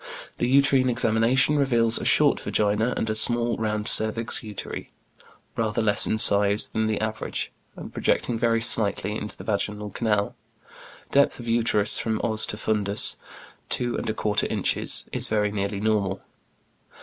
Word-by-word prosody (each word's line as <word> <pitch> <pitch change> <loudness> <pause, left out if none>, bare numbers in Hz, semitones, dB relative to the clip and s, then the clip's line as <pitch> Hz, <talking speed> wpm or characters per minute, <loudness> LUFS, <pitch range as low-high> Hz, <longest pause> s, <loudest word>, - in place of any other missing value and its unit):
The 120 - 0
uterine 135 -1 +3
examination 120 +4 +1
reveals 120 -4 +3
a - - -6
short - - +2
vagina, 105 +3 -1
and - - -2
a 110 - -1
small, 120 +2 +1
round 105 -1 -3
cervix 110 +1 +3
uteri, 105 -3 -7 0.7
rather 110 -1 -1
less 105 -2 +3
in 110 - -1
size 100 -1 +4
than 110 0 -2
the 110 -1 -2
average, 110 0 -4 0.2
and - - -10
projecting 120 - -1
very 115 0 0
slightly 105 -2 +2
into 105 -1 -6
the - - -10
vaginal 105 0 -3
canal. 105 -1 -1 0.8
Depth 140 -1 +2
of 120 - -9
uterus 115 -3 +1
from 110 -1 -2
os 110 -2 +2
to 105 - -5
fundus, 105 -1 0 0.5
two 120 -1 -1
and - - -4
a - - -1
quarter 105 -1 -1
inches, - - -1
is - - +2
very 105 -1 0
nearly 100 0 -3
normal. 100 -3 -1
110 Hz, 155 wpm, -24 LUFS, 105-115 Hz, 0.8 s, size